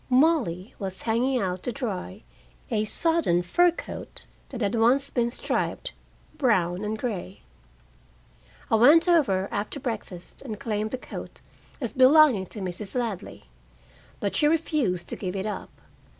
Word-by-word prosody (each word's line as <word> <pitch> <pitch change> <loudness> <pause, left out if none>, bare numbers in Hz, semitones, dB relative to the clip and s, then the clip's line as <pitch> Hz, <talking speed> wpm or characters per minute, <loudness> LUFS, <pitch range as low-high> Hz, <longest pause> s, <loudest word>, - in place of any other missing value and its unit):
Molly 250 - +2
was 190 -2 -5
hanging 245 +4 +1
out 185 -3 -2
to 245 - -3
dry 205 - -5 0.5
a 215 - +1
sodden 320 - +2
fur 350 - +4
coat, 345 - -8 0.2
that 250 -3 -6
had 205 +1 +1
once 250 +5 +3
been 235 -2 +1
striped, 240 - -2 0.5
brown 190 - +2
and 215 +1 -2
gray. 215 - -5 1.3
I 225 - +5
went 300 +9 +6
over 240 - +3
after 210 +7 -3
breakfast 215 -8 -6
and 220 -6 -6
claimed 215 -1 -2
the 260 - -3
coat - - -9 0.4
as 240 -6 -4
belonging 260 -6 +6
to 210 - -8
Mrs. 190 +3 -5
Ladley. 230 -6 -3 0.8
But 200 - -2
she 295 - +4
refused 295 - 0
to - - -3
give 185 -1 -4
it 195 +1 -2
up. 210 - -4
225 Hz, 145 wpm, -26 LUFS, 190-270 Hz, 1.3 s, went